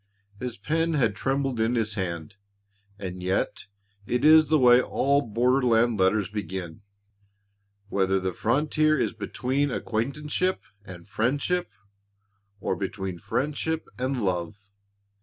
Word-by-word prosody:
His 125 -2 -4
pen 165 +1 0
had 115 -8 +2
trembled 135 0 -1
in 115 +2 +1
his 110 -2 0
hand. 90 -1 -4 0.6
And 90 -2 -6
yet 95 +1 -1 0.4
it 125 +3 0
is 155 0 +7
the 160 - +5
way 125 -2 +6
all 140 +2 +1
borderland 120 -1 +2
letters 95 +2 +2
begin, 95 -3 -6 1.1
whether 95 -1 +1
the 95 -1 -2
frontier 155 - +2
is - - 0
between 130 +6 -1
acquaintanceship 150 +11 -2 0.2
and 90 -3 -11
friendship, 140 - 0 0.9
or 95 - -1
between 95 -2 -4
friendship 150 - -2
and 130 -2 -1
love. 90 +2 -2
120 Hz, 120 wpm, -26 LUFS, 95-140 Hz, 1.1 s, is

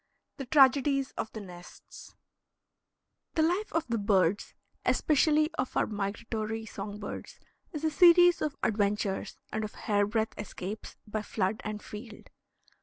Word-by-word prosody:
THE 270 -3 -6
TRAGEDIES 275 0 +4
OF 220 - -4
THE 220 - -7
NESTS 180 -2 -12 1.2
The 320 - +3
life 360 +6 0
of 330 0 0
the 230 -1 -1
birds, 200 -2 +1 0.3
especially 305 +1 +3
of 255 - -1
our - - +3
migratory 215 +2 -3
song 205 -1 -7
birds, 205 - -7 0.3
is 305 -3 -6
a 315 - +1
series 350 +2 +6
of 300 -2 -1
adventures 205 -2 0 0.2
and 220 - -1
of 215 - -6
hair 205 -1 +1
breadth 220 +1 -1
escapes 210 0 -6
by 215 0 -3
flood 210 0 -2
and 210 0 -5
field. 215 +1 -10
220 Hz, 140 wpm, -29 LUFS, 205-285 Hz, 1.2 s, series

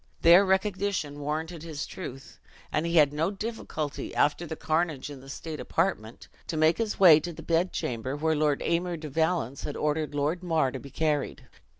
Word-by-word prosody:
Their 175 +4 +8
recognition 190 -6 0
warranted 155 +3 -3
his 155 -3 -5
truth; 135 -7 -9 0.3
and 155 +2 0
he 170 - -1
had 150 -3 +5
no 160 +4 +1
difficulty, 195 -8 -5
after 150 +4 +1
the 160 - -5
carnage 155 -3 -1
in 135 -2 -9
the 135 - -13
state 155 +2 -6
apartment, 115 - -2 0.2
to 160 - -3
make 155 +4 +3
his 225 -2 -2
way 170 -6 +9
to 175 +3 -5
the 160 - -10
bed 170 +2 +1
chamber 125 +3 -3
where 160 +2 +1
Lord 150 -1 +1
Aymer 170 +1 0
de 155 -1 -7
Valence 160 -3 0
had 145 - -4
ordered 150 0 -1
Lord 150 +5 0
Mar 160 -7 +1
to 135 - -5
be 140 - -11
carried. 145 - -1
155 Hz, 190 wpm, -28 LUFS, 145-175 Hz, 0.3 s, way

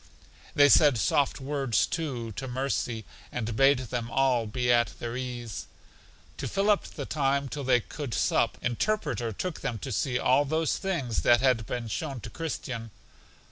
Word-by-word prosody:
They 145 0 +7
said 145 -2 +6
soft 140 +6 +1
words, 135 -3 +1
too, 125 -8 -3
to 135 +6 -6
Mercy, 125 -3 -2 0.3
and 115 -2 -3
bade 135 +3 +5
them 120 -2 -4
all 125 -3 +2
be 125 +3 0
at 120 0 +1
their 120 0 -5
ease. 120 -3 -5 0.7
To - - -3
fill 200 +2 +2
up 205 - +1
the 140 - -7
time 140 -1 0
till 145 +2 -5
they 125 -2 +3
could 140 0 -5
sup, - - +1
Interpreter 120 - -1
took 175 - -4
them 115 - -2
to 135 +5 -6
see 125 +4 0
all 130 +3 +3
those 160 +2 0
things 145 - -1
that 120 -1 +5
had 125 -5 +2
been 120 -2 -3
shown 135 +3 -4
to 115 - -8
Christian. 130 -8 -5
130 Hz, 170 wpm, -28 LUFS, 120-145 Hz, 0.7 s, They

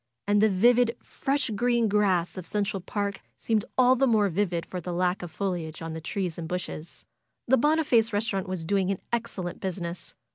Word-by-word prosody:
And 205 0 +3
the 220 - +5
vivid, 235 +5 +4
fresh 275 -3 -1
green 235 +2 +2
grass 195 -4 +2
of 185 -3 -7
Central 205 -1 -1
Park 200 +1 -3 0.2
seemed 220 -2 0
all 255 0 +6
the 270 +1 +3
more 215 -4 +3
vivid 175 -2 -1
for 180 - -5
the 180 - -5
lack 180 +1 0
of 175 - -6
foliage 165 -3 -3
on 165 -1 -5
the 160 - -6
trees 175 0 -3
and 165 - -4
bushes. 170 -2 -6 0.4
The 265 +2 +5
Boniface 270 -5 +3
restaurant 205 -3 -1
was 185 -3 -3
doing 195 +2 +1
an 195 - 0 0.2
excellent 210 -7 -3
business. 180 -2 -4
200 Hz, 185 wpm, -27 LUFS, 180-225 Hz, 0.4 s, all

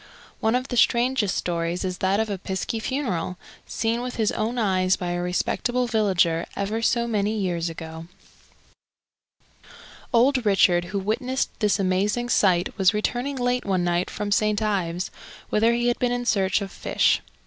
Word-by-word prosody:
One 220 +2 +1
of 255 +2 -2
the 245 - -2
strangest 235 -3 +2
stories 170 +1 -2
is 185 -1 -4
that 190 +2 +1
of 220 - +1
a 200 -3 -4
piskie 190 +4 -3
funeral, 205 - -2 0.3
seen 230 +1 -1
with 250 0 -5
his 220 -2 +1
own 230 +3 -2
eyes 185 -4 +2
by 175 -1 -4
a 175 0 -2
respectable 240 +7 0
villager 190 -7 +1
ever 210 +3 -2
so 235 +1 +2
many 215 -1 0
years 175 -4 -1
ago. 160 0 -8 2.0
Old 255 +1 +3
Richard, 180 -4 +3
who 190 +3 -4
witnessed 245 +7 -1
this 210 -3 +2
amazing 200 +6 0
sight, 180 -6 +2
was 190 +2 +4
returning 245 +6 -1
late 245 -1 0
one 190 -3 0
night 175 +1 0
from 205 -1 -4
St. 210 0 +2
Ives, 185 -4 -1 0.4
whither 225 +2 +3
he 240 0 0
had 240 -1 +1
been 245 -1 +1
in 245 0 -2
search 195 -3 +2
of 195 -1 -5
fish. - - +1
210 Hz, 165 wpm, -24 LUFS, 185-235 Hz, 2.0 s, was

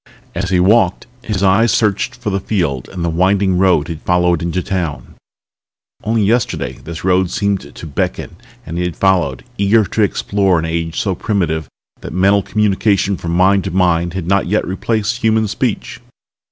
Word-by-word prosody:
As 95 +2 -3
he 90 -1 +2
walked 95 0 +3 0.2
his 105 -5 -3
eyes 100 +5 +4
searched 110 +4 0
for 120 -5 -4
the 95 - 0
field 85 - -2
and 90 -3 -4
the - - 0
winding 95 +2 +2
road 90 -6 +3
he'd 85 -2 -6
followed 90 -2 +1
into 85 +1 -2
town. 85 -6 -4 0.9
Only 110 0 +1
yesterday 115 +3 -1
this 85 0 -7
road 95 0 +3
had - - -7
seemed 100 -6 -2
to - - -9
beckon 70 -3 -3 0.3
and 85 +2 -5
he - - 0
had 90 -2 -3
followed, 85 -10 +1 0.2
eager 105 +2 +3
to 110 - -2
explore 100 -2 +1
an 80 - -1
age 80 0 -2
so 100 -5 0
primitive 85 -5 -1 0.3
that - - -8
mental 100 +3 +3
communication 100 -1 +1
from 85 -2 -4
mind 95 +2 +3
to - - -2
mind 85 -1 +1
had 95 -3 -3
not 100 +1 +1
yet 105 +4 0
replaced 110 +4 -1
human 110 -2 +1
speech. 100 - -3
95 Hz, 180 wpm, -16 LUFS, 85-100 Hz, 0.9 s, eyes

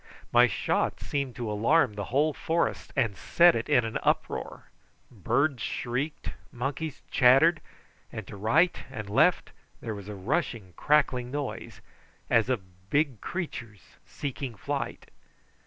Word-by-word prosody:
My 120 +1 +6
shot - - -1
seemed 140 -4 -3
to 120 -1 -4
alarm 115 +4 +3
the 100 -1 -4
whole 145 +7 +1
forest 165 +3 -1
and 120 -8 +1
set 170 - +5
it 115 - -3
in 120 - +4
an 110 - -3
uproar: - - -1 0.5
birds 120 - 0
shrieked, 130 +9 -3 0.2
monkeys 140 +4 -4
chattered, 135 +7 +5 0.5
and - - -6
to - - -10
right 140 - +2
and 110 -6 -6
left 100 - +3 0.3
there 110 - -4
was 100 -1 -8
a 105 - -6
rushing 100 - -2
crackling 130 -5 +2
noise, 145 0 -5 0.5
as 115 +1 +4
of 95 -6 -5
big 140 -4 +1
creatures 125 - -5 0.3
seeking 135 -3 -5
flight. - - -4
125 Hz, 135 wpm, -28 LUFS, 110-145 Hz, 0.5 s, My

